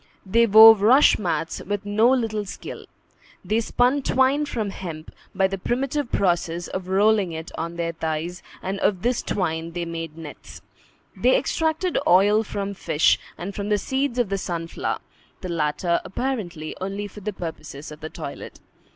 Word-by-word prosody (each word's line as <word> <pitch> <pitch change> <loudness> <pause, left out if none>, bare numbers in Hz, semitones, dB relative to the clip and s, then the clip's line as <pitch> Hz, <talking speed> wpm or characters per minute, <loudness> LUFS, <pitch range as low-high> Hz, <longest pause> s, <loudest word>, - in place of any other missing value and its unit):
They 230 +5 +3
wove 220 0 +9
rush 250 +7 +6
mats 165 -4 -2
with 205 +1 -4
no 215 +3 +3
little 225 -5 0
skill. 195 - -8 0.6
They 215 +2 +1
spun 245 +4 +2
twine 265 +3 +2
from 220 -7 -3
hemp, 165 -5 -8 0.2
by 190 0 +3
the 195 0 -2
primitive 265 +5 -2
process 175 -2 0
of 185 -1 -5
rolling 200 -1 +3
it 160 +1 -7
on 170 +1 -4
their 170 0 -2
thighs; 160 +2 -4 0.2
and 195 +1 -3
of 190 -2 0
this 245 0 +1
twine 165 -2 -2
they 175 -1 -3
made 165 -1 -6
nets. 160 -3 -11 0.5
They - - +3
extracted 325 -4 0
oil 205 +4 +5
from 200 -1 -4
fish 160 -5 +2 0.2
and 195 +3 -6
from 200 +1 -4
the 210 - +3
seeds 265 +4 -1
of 240 -5 +1
the 195 0 -1
sunflower, 165 -2 -3 0.4
the 185 - -5
latter, 170 +1 0
apparently, 190 - -4
only 195 +2 -3
for 205 - -12
the 210 +1 -4
purposes 155 -5 -7
of 150 - -10
the 155 0 -6
toilet. - - -8
195 Hz, 165 wpm, -23 LUFS, 170-225 Hz, 0.6 s, wove